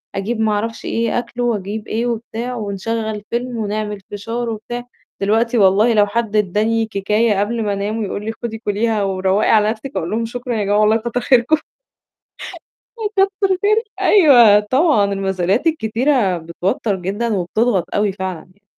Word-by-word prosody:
أجيب 220 +4 -2
ما 220 -1 +2
أعرفش 225 +2 -3
إيه، 230 +1 0
أكلُه 245 0 -5
وأجيب 215 -2 -2
إيه 230 +2 -1
وبتاع 235 +1 -4
ونشغّل 215 0 -3
فيلم 240 0 -3
ونعمل 210 -1 -3
فشار 230 +4 -4
وبتاع، 240 +3 -5 0.4
دلوقتي 225 +4 +1
والله 205 +4 +4
لو 205 -1 +4
حد 220 0 -2
ادّاني 215 +3 +1
كيكاية 210 +1 0
قبل 225 +3 -1
ما 205 -1 -1
أنام 205 +3 -2
ويقول 205 0 -4
لي 225 - -2
خُدي 225 -1 -3
كُليها 215 0 -1
وروّقي 190 +1 +1
على 215 -1 +4
نَفْسِك. 235 +4 -7
أقول 170 -2 -2
لهم 230 +1 -1
شكرًا 245 +1 -4
يا 210 - 0
جماعة 205 +1 +2
والله 215 +1 +4
كتّر 235 +2 -3
خيركم. 255 +5 +3 1.4
آه 420 -2 -1 0.2
كتّر 390 -1 -1
خير 425 +3 +3 0.2
أيوه 245 - +6
طبعًا، 210 - +2
المسؤوليات 195 - 0
الكتيرة 235 - +1
بتوتَّر 180 +5 -2
جدًا 200 +4 -2
وبتضغط 190 +1 0
أوي 205 -1 +1
فعلًا 185 -3 -6
ي 200 - -35
220 Hz, 160 wpm, -18 LUFS, 200-235 Hz, 1.4 s, أيوه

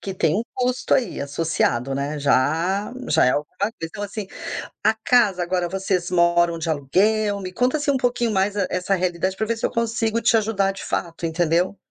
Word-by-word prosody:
que 195 - -5
tem 165 -4 +1
um 220 - 0
custo 250 0 -1
aí 260 -3 0
associado, 140 -3 -1
né, 140 +2 -2
já 160 - +1 0.2
já - - +4
é 125 - +4
alguma 145 +3 -3
coisa. 215 +3 -1
Então, 165 +6 -5
assim, 205 0 -5 0.6
a - - +5
casa 220 -4 +2
agora 175 0 -1
vocês 190 -1 -1
moram 170 -1 +3
de 165 0 -4
aluguel, 200 +8 +1
me 185 -1 -6
conta 250 +8 +1
assim 290 0 0
um - - +1
pouquinho 245 -2 0
mais 195 0 +1 0.2
essa 185 +2 0
realidade 185 +1 -1
pra 220 - -1
ver 230 +1 -1
se - - -7
eu - - -4
consigo 230 -1 0
te 230 - +3
ajudar 205 -3 +1
de 195 - -9
fato, 170 -1 -3
entendeu? 170 +3 +1
190 Hz, 195 wpm, -22 LUFS, 165-220 Hz, 0.6 s, a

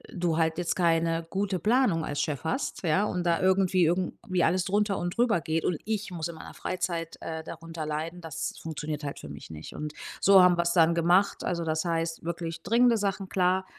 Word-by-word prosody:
du 170 -3 0
halt 160 0 +1
jetzt 175 -1 -1
keine 165 -1 +1
gute 195 -1 -1
Planung 210 -5 +2
als 145 - -2
Chef 150 -4 -2
hast, 255 - -2
ja, 175 +4 +2
und 180 -4 -2
da 170 -1 +2
irgendwie 185 -1 +3
irgendwie 180 +1 0
alles 180 +2 +2
drunter 205 0 +1
und 175 +3 -3
drüber 235 -8 +3
geht. 160 0 -1
Und 175 - +1
ich 215 -1 -2
muss 165 -2 -3
in 170 - -7
meiner - - -10
Freizeit, 170 -2 -3
äh, 160 0 -5
darunter 165 -1 -7
leiden, 160 +3 -4
das 160 -1 -5
funktioniert 155 -1 -5
halt 140 - -5
für - - -9
mich 70 +1 -10
nicht. 80 -1 -9
Und 150 0 -5 0.3
so 195 -1 +7
haben 180 -1 +5
wir's 170 0 +1
dann 170 -1 +4
gemacht. 175 +4 +3
Also 170 -1 -1
das 160 +1 -1
heißt: 165 -1 -2
Wirklich 165 -1 -4
dringende 235 +1 +4
Sachen, 195 -2 -2
klar, 185 0 +2
170 Hz, 205 wpm, -28 LUFS, 160-185 Hz, 0.3 s, so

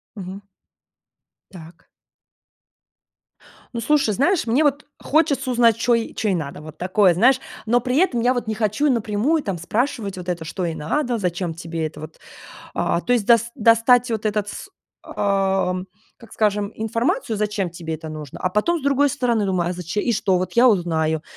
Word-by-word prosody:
Мгм. 195 0 -8 1.1
Так. 170 -2 -13 1.9
Ну, 235 - -3
слушай, 280 -3 +2
знаешь, 310 - +1
мне 245 +7 +2
вот 290 0 +1 0.2
хочется 295 -3 +1
узнать, 235 -3 +4
чё 240 +1 +2
ей 230 -1 -3
чё 220 - -2
ей 190 - +2
надо, 150 -3 -5
вот 155 0 -11
такое, 185 0 +3
знаешь, 250 +8 +4 0.3
но 240 +2 +3
при 250 +2 -1
этом 305 -9 +2
я 245 +2 +3
вот 245 - -2
не 220 - -1
хочу 215 +6 0
напрямую 235 +7 0
там 195 -8 -3
спрашивать 215 - -2
вот 180 0 -6
это, 170 -2 -3
что 180 +3 -4
ей 165 -1 -3
надо, 245 - -1
зачем 175 -4 -2
тебе 165 -1 -4
это 155 -1 -12
вот. 155 +1 -10 0.6
А, 170 - 0
то 245 - -1
есть 240 -4 +2
дос 235 -1 +5
достать 230 +2 +4
вот 220 -1 -2
этот, 210 -1 -1
с 300 - -8 0.4
а, 195 -2 0 0.4
как 230 - -16
скажем, 205 -1 0
информацию, 230 - -1
зачем 210 -2 -1
тебе 165 -1 -6
это 160 0 -8
нужно, 155 -3 -8
а 185 - +1
потом 210 - +1
с - - -12
другой 280 +1 +2
стороны 240 -6 0
думаю: 185 -3 0
"А - - -1
заче 180 +3 -3
и 235 - 0
что 195 -4 +1
вот 185 - -3
я 240 +2 +6
узнаю, 160 -7 +1
210 Hz, 185 wpm, -21 LUFS, 180-245 Hz, 1.9 s, я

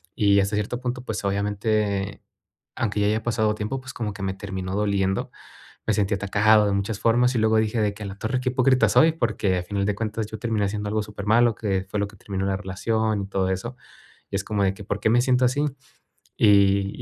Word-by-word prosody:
Y 100 -1 +4
hasta 100 +2 0
cierto 105 +4 -2
punto, 125 0 -3
pues, 110 -4 -4
obviamente, 100 0 -1 0.5
aunque 105 -3 -1
ya 100 - +3
haya 110 +1 0
pasado 110 -2 +1
tiempo, 105 +5 -3
pues, 130 +1 -9
como 110 -4 -4
que 100 -1 -7
me 95 -1 -1
terminó 95 -1 -5
doliendo, 100 -2 0 0.6
me - - +2
sentí 100 0 +1
atacado 105 +2 +3
de 100 - +1
muchas 100 +2 -1
formas. 120 +2 +3
Y - - +1
luego 110 0 +3
dije 110 +1 0
de 105 -1 +1
que: 105 - -11
"A - - -5
la 95 - -7
torre, 125 +3 -1
qué 130 - 0
hipócrita 130 +1 +3
soy", 160 0 +5
porque 110 - 0
a 90 - -2
final 100 +1 -2
de 105 - 0
cuentas 110 +1 -3
yo 110 - -7
terminé 110 -2 0
haciendo 105 +1 -3
algo 110 +1 0
súper 105 -1 -8
malo, 115 +2 +4
que 95 -4 -2
fue 105 +1 -2
lo 100 - 0
que 105 - -16
terminó 95 0 -4
la 95 -1 0
relación 105 +2 -1
y - - -5
todo 95 -1 -1
eso. 105 +7 -4 0.5
Y - - -4
es 100 - -1
como 105 -2 -1
de 95 0 +2
que, 100 - -11
¿por 100 - -3
qué 110 - +1
me 120 +2 +4
siento 125 0 +3
así? 145 +4 +1 0.8
Y 100 -2 +5
105 Hz, 235 wpm, -24 LUFS, 100-110 Hz, 0.8 s, soy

